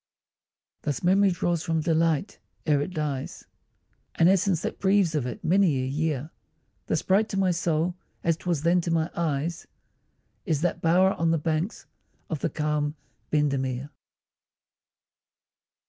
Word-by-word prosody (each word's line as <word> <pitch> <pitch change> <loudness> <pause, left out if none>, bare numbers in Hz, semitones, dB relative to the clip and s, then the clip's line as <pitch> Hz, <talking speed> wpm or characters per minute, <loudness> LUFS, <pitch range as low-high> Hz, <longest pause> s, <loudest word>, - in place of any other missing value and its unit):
Thus 145 +1 -3
memory 195 +3 +4
draws 175 -2 0
from 165 -2 0
delight, 165 +2 +1 0.3
ere 145 -3 +3
it 165 - -3
dies, 150 -5 -4 0.7
An 165 - +4
essence 190 -2 +2
that - - -4
breathes 195 -3 +3
of 145 -5 -1
it 120 - -7
many 175 -3 +3
a 130 - -1
year; 150 +1 -2 0.6
Thus - - 0
bright 205 +4 +2
to 195 - -3
my 190 -1 +3
soul, 170 0 0 0.3
as 165 -1 +2
'twas 170 -3 -2
then 175 +1 +3
to 170 - -3
my 165 0 0
eyes, 165 0 -2 0.8
Is 160 -6 0
that 175 0 -1
bower 185 +4 +4
on 165 0 0
the 165 - +3
banks 160 +6 -2 0.5
of 155 - -1
the 165 - -1
calm 150 -1 -1 0.3
Bendemeer! 140 -2 0
165 Hz, 145 wpm, -26 LUFS, 150-180 Hz, 0.8 s, memory